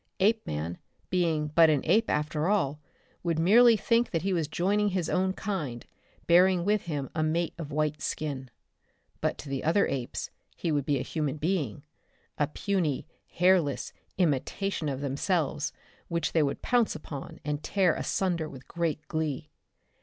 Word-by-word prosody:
Apeman, 90 - 0 0.3
being 165 -4 +1
but 165 +1 +6
an 150 -3 +3
ape 225 +1 +3
after 150 +1 0
all, 155 -8 +1 0.4
would 170 -2 0
merely 225 +7 +6
think 230 +3 +2
that 165 -1 -1
he 195 0 +1
was 165 -4 0
joining 200 +6 +1
his 180 -4 -1
own 185 +1 +2
kind, 170 - -4 0.4
bearing 180 +1 +5
with 210 0 +1
him 145 -5 -3
a 155 - -1
mate 160 +2 0
with 155 -3 -5
white 150 0 -1
skin. 135 -4 -3 0.7
But - - -1
to - - -9
the 135 -1 -3
other 170 +6 +3
apes 125 -3 -3 0.2
he 170 - -2
would 145 -2 0
be 145 -2 +2
a 125 - -2
human 155 -3 -2
being, 150 - -1 0.6
a 145 - +3
puny 165 -3 -1 0.2
hairless 175 -6 +2 0.2
imitation 170 +1 0
of 135 -1 -3
themselves 150 +2 0 0.4
which 170 -2 -1
they 165 - +4
would 140 -2 -1
pounce 240 -6 +2
upon 150 -3 -8
and 150 0 -2
tear 185 -3 +2
asunder 170 -5 -1
with 130 -1 -12
great 160 -3 -2
glee. 155 -2 -3
160 Hz, 160 wpm, -28 LUFS, 145-185 Hz, 0.7 s, but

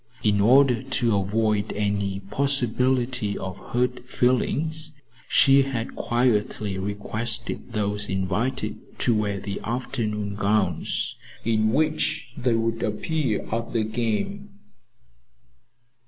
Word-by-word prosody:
In 105 -1 +3
order 125 +1 +5
to 120 -4 +1
avoid 105 +1 +1
any 100 -2 -1
possibility 125 -1 0
of 95 0 -6
hurt 125 +1 +1
feelings, 155 +6 0 0.4
she 135 0 +6
had 130 -4 -3
quietly 110 -5 0
requested 110 +4 -4
those 105 -1 -1
invited 100 +8 -2
to 120 - +2
wear 105 -2 0
the 100 0 -4
afternoon 110 -4 -2
gowns 100 +1 0 0.3
in 110 -1 +2
which 155 0 +1
they 120 -2 +1
would 115 0 0
appear 120 +2 -1
at 115 +2 -2
the 115 -2 +2
game. 120 - -2
115 Hz, 105 wpm, -25 LUFS, 105-125 Hz, 0.4 s, she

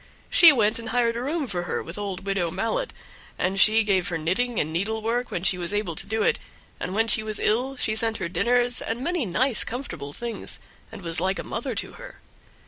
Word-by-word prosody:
She 335 -2 +9
went 220 -5 +2
and 230 -1 -6
hired 235 -1 +1
a 235 - -3
room 295 +4 -2
for 185 -8 -3
her 175 - -3
with 165 - -8
old 195 -2 -5
Widow 195 -4 0
Mallet, 475 - -2 0.5
and 190 +2 0
she 220 +2 +6
gave 190 -3 +1
her 175 -4 -2
knitting 205 +9 -1
and 155 +1 -2
needlework 220 +6 -1
when 175 - -4
she 180 -1 +2
was 175 +3 -1
able 205 -5 -1
to 160 - -8
do 220 +1 0
it; - - +2 0.4
and 185 - -4
when 225 +1 +2
she 220 - +3
was 215 0 -4
ill 250 +5 0
she 215 -3 +1
sent 225 0 +1
her 185 - -3
dinners 240 +7 +2
and 235 +3 -3
many 345 - -1
nice, 250 +7 +3
comfortable 170 - -6
things, 235 +8 -6 0.3
and 195 - -10
was 165 0 -2
like 190 +1 0
a - - -4
mother 240 +1 -4
to - - -3
her. - - -11
215 Hz, 220 wpm, -25 LUFS, 185-240 Hz, 0.5 s, She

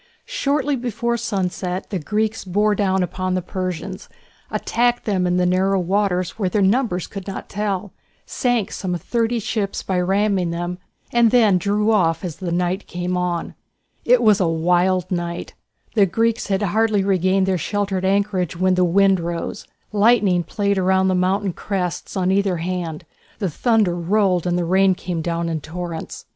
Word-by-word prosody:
Shortly 290 - 0
before 235 -1 -2
sunset 190 -4 -3
the 190 - -1
Greeks 215 +6 -1
bore 205 +3 +1
down 190 -2 +1 0.2
on 185 0 0
the 185 - 0
Persians, 185 +1 -5 0.4
attacked 240 +1 0
them 185 -4 +1
in 180 0 +1
the 180 - +2
narrow 190 +2 +2
waters 185 +1 0
where 190 -3 +1
their 200 +2 +1
numbers 195 -3 +1
could 195 -1 -8
not 195 - -6
tell, 200 -2 -3 0.3
sank 245 -6 0
some 180 -3 -3
thirty 230 +6 -1
ships 210 -2 -2
by 185 -2 -1
ramming 195 -1 +1
them, 175 +1 -4 0.3
and 235 -1 +4
then 215 -6 +4
drew 210 +3 +1
off 180 -4 +2
as 170 -4 -5
the 180 -3 -4
night 180 +3 -1
came 180 +1 -3
on. 180 -1 -2 0.5
It 245 0 +4
was 215 -2 +5
a 185 - +2
wild 175 +3 +1
night. 175 -1 -3 0.4
The 205 -4 +4
Greeks 225 +5 0
had 195 0 0
hardly 210 +1 +2
regained 190 0 +2
their 190 -2 0
sheltered 200 0 -1
anchorage 190 -3 0
when 185 +1 +2
the 180 0 +3
wind 195 +2 +4
rose, 170 +3 -4 0.2
lightning 205 -4 +4
played 200 +1 -1
round 190 0 +2
the - - +1
mountain 185 +1 +1
crests 185 0 -3
on 185 0 +1
either 195 -2 +1
hand, 170 -2 -4 0.3
the 195 -6 -2
thunder 220 - +2
rolled 180 0 +1
and 175 0 +1
the 175 - 0
rain 190 +2 +3
came 175 -2 -4
down 170 +1 -2
in 160 -2 -2
torrents. 165 +1 -6
190 Hz, 170 wpm, -21 LUFS, 180-210 Hz, 0.5 s, was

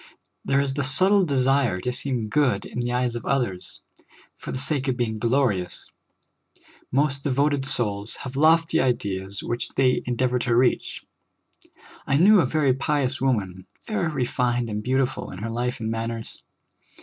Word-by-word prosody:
There 135 0 +1
is 140 -1 0
the 140 0 -2
subtle 185 +9 +4
desire 135 - +1
to 125 - -2
seem 125 -3 -1
good 120 -4 +1
in - - -6
the 120 0 -1
eyes 125 -1 -1
of 120 - -5
others, 120 -10 -2 0.5
for - - -8
the - - -3
sake 140 0 -1
of 130 -2 0
being 110 -3 -2
glorious; 115 -7 -1 1.0
most 140 0 0
devoted 140 0 +1
souls 105 -4 0
have 130 0 -7
lofty 160 +3 +3
ideals 100 -6 -2
which 120 0 -3
they 130 -1 +2
endeavor 125 +1 0
to 120 -1 0
reach. 125 +1 +1 1.0
I 135 - +2
knew 200 +6 +6
a 140 - 0
very 145 -2 +2
pious 140 -1 -1
woman, 95 -8 -1 0.2
very 215 -6 -1
refined 125 -4 -1
and 105 0 -3
beautiful 130 +2 -1
in 95 - -9
her 110 +4 -5
life 125 +2 -2
and 110 0 -3
manners. 115 0 -5
125 Hz, 160 wpm, -24 LUFS, 115-140 Hz, 1.0 s, knew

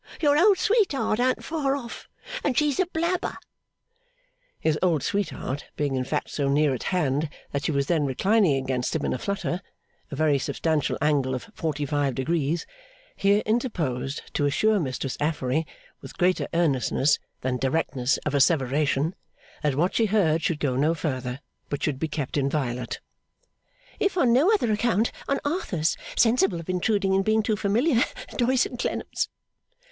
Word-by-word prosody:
Your 290 -2 +4
old 380 +5 +5
sweetheart 375 - +2
an't 255 +1 +1
far 290 -4 0
off, 240 -4 -8 0.3
and 255 - 0
she's 295 -3 +2
a 375 - +3
blabber.' 345 +2 -1 1.2
His 155 -1 +1
old 165 -6 +2
sweetheart, 175 -8 -2
being 145 -2 -1
in 130 -1 -1
fact - - -2
so 140 -2 -1
near 145 0 +3
at 125 - -4
hand 150 -4 0 0.2
that 140 +1 -2
she - - +1
was 140 -1 +1
then 155 -2 +1
reclining 190 - +3
against 130 -1 -1
him - - -1
in - - 0
a 130 - -3
flutter, 200 -2 -2 0.5
a 140 - -5
very 150 -1 +2
substantial 155 +1 0
angle 140 -3 +2
of 130 - -7
forty 150 -6 -2
five 145 -3 0
degrees, 155 +4 0 0.5
here 200 +2 +3
interposed 155 - -1
to 145 - +1
assure 215 +9 +2
Mistress 130 -3 -3
Affery 150 0 0 0.3
with - - -11
greater 180 +1 +2
earnestness 145 -3 +2 0.2
than 130 0 -1
directness 130 -1 0
of 150 - -1
asseveration, 140 +1 +2 0.5
that 150 -3 +1
what 175 +6 +1
she 225 - +2
heard 175 -6 +2
should 165 -3 -1
go 135 -5 0
no 150 +5 +2
further, 130 -4 -3 0.3
but 145 - -3
should 145 -4 -1
be 160 - -1
kept 150 -2 -3
inviolate, 135 -4 -1 1.0
'if 390 -1 +1
on 250 -8 +4
no 295 - +5
other 370 - +2
account 215 0 +1 0.2
on 275 - +1
Arthur's 195 - 0 0.2
sensible 215 -7 +3
of 165 - -10
intruding 195 +1 +1
in 195 - +3
being 215 +2 +2
too 215 +1 +1
familiar 230 +6 +2 0.3
Doyce 250 +1 +3
and 245 - -7
Clennam's. - - -2
160 Hz, 160 wpm, -25 LUFS, 140-220 Hz, 1.2 s, old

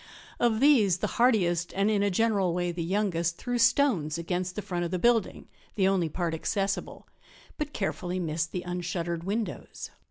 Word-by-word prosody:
Of 230 -1 +2
these 230 - +5
the - - -2 0.2
hardiest, 175 -8 +2
and 200 +2 +2
in 205 -2 +2
a 205 - +2
general 195 -3 +1
way 175 -1 -1
the 170 0 -5
youngest, 170 -3 0
threw 245 -1 -2
stones 230 - +3
against 180 +2 -3
the 210 - -4
front 175 -1 -3
of 170 - -2
the 185 - -1
building, 230 +2 +1 0.3
the 190 -3 +3
only 185 -4 +1
part 170 +1 -2
accessible, 195 +4 -2 0.5
but 300 -1 -3
carefully 185 -5 -3
missed 165 -1 -2
the 180 - -4
unshuttered 175 -1 -3
windows. 210 +3 -4
185 Hz, 170 wpm, -28 LUFS, 175-215 Hz, 0.5 s, these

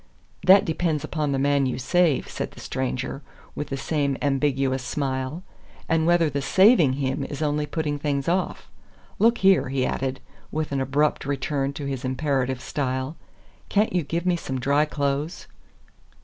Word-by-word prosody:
"That 190 +1 +7
depends 160 -2 -1
upon 150 -3 -2
the 135 - 0
man 140 0 +2
you 125 - -2
save," 160 +2 +2
said - - -4
the - - -13
stranger, 130 +1 -3 0.3
with 150 - -4
the 135 - -4
same 140 -1 -1
ambiguous 135 -2 0
smile, 135 +4 -3 0.4
"and 160 0 +2
whether 175 -1 +4
the 140 -1 -2
SAVING 185 - +5
him 135 -1 -1
is 145 +1 -4
only 150 0 0
putting 150 -2 -2
things 140 -2 -1
off. 180 +2 -1 0.5
Look 230 +2 +4
here," 190 -8 +4
he 130 -1 0
added, 135 0 -2 0.3
with 155 -1 -2
an 135 -1 0
abrupt 145 +3 +1
return 140 0 -1
to 140 0 -6
his 135 -2 -4
imperative 130 -1 -1
style, 130 +1 -2 0.5
"can't 210 0 +2
you 180 - +2
give 165 +3 -3
me 180 -1 +3
some 135 -5 -4
dry 140 +4 +2
clothes?" 145 +2 -2
145 Hz, 165 wpm, -24 LUFS, 135-160 Hz, 0.5 s, That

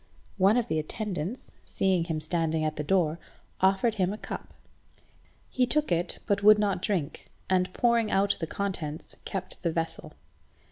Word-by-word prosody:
One 195 +5 +5
of 240 -1 +1
the 160 - 0
attendants, 195 +5 -4
seeing 185 -3 +1
him 160 -3 -2
standing 160 0 0
at 155 0 -1
the 150 - -3
door, 165 -1 +1 0.4
offered 195 +4 +3
him 185 +1 +2
a 210 - -4
cup. - - -7 1.0
He 250 -1 +1
took 300 +4 +1
it, 170 +1 0
but 200 -2 +1
would 210 +1 +8
not 200 -3 0
drink, 175 -9 -2 0.2
and 185 -1 +2
pouring 235 0 +2
out 200 0 +2
the 165 - -3
contents, 165 -5 -4
kept 185 -1 -5
the 170 - 0
vessel. 165 0 -4
185 Hz, 160 wpm, -28 LUFS, 165-210 Hz, 1.0 s, would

